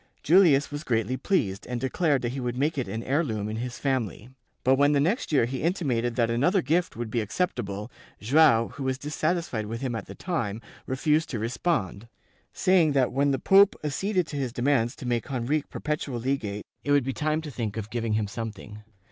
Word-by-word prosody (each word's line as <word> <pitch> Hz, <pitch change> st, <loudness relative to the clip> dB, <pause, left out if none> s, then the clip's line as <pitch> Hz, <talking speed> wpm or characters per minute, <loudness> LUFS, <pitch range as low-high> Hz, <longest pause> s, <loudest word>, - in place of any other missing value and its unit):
Julius 155 Hz, -5 st, +5 dB
was 145 Hz, +2 st, -5 dB
greatly 115 Hz, -3 st, 0 dB
pleased 110 Hz, -, -1 dB
and 125 Hz, -1 st, -3 dB
declared 140 Hz, +2 st, +1 dB
that 120 Hz, -, 0 dB
he 135 Hz, -, -4 dB
would 125 Hz, -1 st, -3 dB
make 150 Hz, +4 st, +1 dB
it 130 Hz, -7 st, -2 dB
an 110 Hz, +4 st, -4 dB
heir 145 Hz, +7 st, +1 dB
loom 110 Hz, -7 st, -3 dB
in 110 Hz, +1 st, -4 dB
his 125 Hz, +1 st, -4 dB
family, 125 Hz, -, -2 dB, 0.3 s
but 130 Hz, -, +4 dB
when 145 Hz, +2 st, +4 dB
the 145 Hz, -, +3 dB
next 175 Hz, -, 0 dB
year 135 Hz, -6 st, +4 dB
he 130 Hz, +2 st, -4 dB
intimated 130 Hz, -9 st, 0 dB
that 115 Hz, -2 st, +1 dB
another 175 Hz, -, +2 dB
gift 170 Hz, +6 st, 0 dB
would 115 Hz, -1 st, -5 dB
be 115 Hz, -, 0 dB
acceptable, 105 Hz, -, -3 dB, 0.3 s
Joao, 120 Hz, -1 st, +4 dB
who 140 Hz, -, -7 dB
was 130 Hz, 0 st, 0 dB
dissatisfied 150 Hz, -5 st, -2 dB
with 115 Hz, +2 st, -5 dB
him 130 Hz, -3 st, -2 dB
at 115 Hz, -, -5 dB
the -, -, -9 dB
time, 115 Hz, -, -2 dB, 0.3 s
refused 150 Hz, +4 st, +1 dB
to 120 Hz, -, -3 dB
respond, 115 Hz, -, -2 dB, 0.4 s
saying 180 Hz, -6 st, +3 dB
that 135 Hz, -3 st, +2 dB
when 140 Hz, +2 st, +2 dB
the 135 Hz, -, +1 dB
pope 195 Hz, +8 st, +5 dB
acceded 180 Hz, +5 st, 0 dB
to 145 Hz, -, -5 dB
his 130 Hz, -3 st, -2 dB
demands 120 Hz, -1 st, +1 dB
to 130 Hz, -, -9 dB
make 120 Hz, +2 st, -1 dB
Henrique 135 Hz, +4 st, -1 dB
perpetual 150 Hz, -5 st, -3 dB
legate 115 Hz, -5 st, -2 dB, 0.2 s
it -, -, -5 dB
would 145 Hz, -2 st, +4 dB
be 135 Hz, -, -2 dB
time 155 Hz, +2 st, 0 dB
to 150 Hz, -, -6 dB
think 110 Hz, -3 st, -4 dB
of 110 Hz, 0 st, -5 dB
giving 115 Hz, -2 st, -1 dB
him 105 Hz, 0 st, +1 dB
something. 105 Hz, -1 st, -7 dB
130 Hz, 205 wpm, -26 LUFS, 115-150 Hz, 0.4 s, Julius